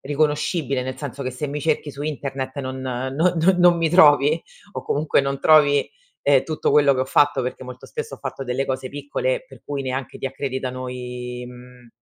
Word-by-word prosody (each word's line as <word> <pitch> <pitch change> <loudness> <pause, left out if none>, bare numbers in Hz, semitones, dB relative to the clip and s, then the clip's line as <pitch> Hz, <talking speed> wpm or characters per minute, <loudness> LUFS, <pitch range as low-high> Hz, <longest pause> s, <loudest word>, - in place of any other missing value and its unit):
riconoscibile, 150 -1 0
nel 130 +1 -5
senso 140 -1 -6
che 130 - -3
se 125 +4 -4
mi 150 +1 -4
cerchi 155 -1 0
su 140 - -11
internet 140 -3 -4
non 130 0 -5
non 130 0 -3 0.2
non 180 +3 +4
non 175 -1 +6
mi 165 -2 +1
trovi, 155 -2 +5 0.3
o - - -5
comunque 150 0 +1
non 140 0 -2
trovi, 145 -2 +5 0.4
ehm, 140 -2 +4
tutto 155 -1 -1
quello 145 -2 +5
che 130 - -1
ho - - +1
fatto, 145 0 +3
perché 125 +1 -4
molto 125 0 -10
spesso - - -6
ho - - -15
fatto 135 - -5
delle 130 +1 -1
cose 130 -1 -3
piccole, 460 - -2
per - - -15
cui 140 -1 -4
neanche 130 -1 -4
ti - - -8
accreditano 130 -1 -4
i 125 0 -6
mhmm, 125 0 -14
135 Hz, 200 wpm, -22 LUFS, 130-150 Hz, 0.4 s, non